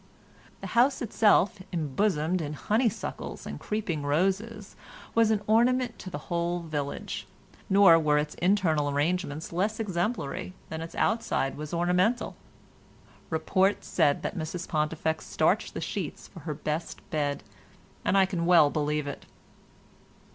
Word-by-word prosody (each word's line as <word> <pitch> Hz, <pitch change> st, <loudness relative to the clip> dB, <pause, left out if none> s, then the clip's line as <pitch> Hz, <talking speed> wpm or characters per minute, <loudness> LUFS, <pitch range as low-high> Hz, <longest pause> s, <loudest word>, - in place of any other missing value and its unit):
The -, -, -5 dB
house 255 Hz, +3 st, +3 dB
itself, 210 Hz, -2 st, +3 dB
embosomed 170 Hz, +1 st, 0 dB
in 150 Hz, -1 st, -4 dB
honeysuckles 220 Hz, -, -2 dB
and -, -, -6 dB
creeping 200 Hz, -8 st, -2 dB
roses, 195 Hz, +8 st, -1 dB, 0.4 s
was 225 Hz, -1 st, +4 dB
an 210 Hz, -2 st, +1 dB
ornament 240 Hz, +2 st, +2 dB
to 185 Hz, -, -7 dB
the 175 Hz, -, -5 dB
whole 175 Hz, 0 st, -1 dB
village, 150 Hz, -4 st, -4 dB, 0.4 s
nor 195 Hz, -4 st, +7 dB
were 150 Hz, -2 st, +3 dB
its 150 Hz, 0 st, -1 dB
internal 175 Hz, -6 st, +2 dB
arrangements 155 Hz, +2 st, -1 dB
less 205 Hz, +6 st, 0 dB
exemplary 185 Hz, -, -2 dB, 0.2 s
than 160 Hz, 0 st, -5 dB
its 165 Hz, -, -7 dB
outside 220 Hz, -11 st, 0 dB
was 150 Hz, 0 st, -7 dB
ornamental. 180 Hz, +7 st, +1 dB, 0.9 s
Report 185 Hz, +5 st, +1 dB
said 150 Hz, -5 st, +2 dB
that -, -, -3 dB
Mrs 170 Hz, +1 st, -4 dB
Pontifex 160 Hz, +1 st, -1 dB
starched -, -, +1 dB
the -, -, -3 dB
sheets -, -, -4 dB
for -, -, -12 dB
her 150 Hz, -, -2 dB
best 155 Hz, +2 st, -4 dB
bed, 145 Hz, -3 st, -1 dB, 0.6 s
and 195 Hz, -, +2 dB
I 190 Hz, -, +6 dB
can 175 Hz, -3 st, -2 dB
well 165 Hz, -5 st, +6 dB
believe 150 Hz, 0 st, -1 dB
it. 145 Hz, -, -7 dB
175 Hz, 135 wpm, -28 LUFS, 150-205 Hz, 0.9 s, nor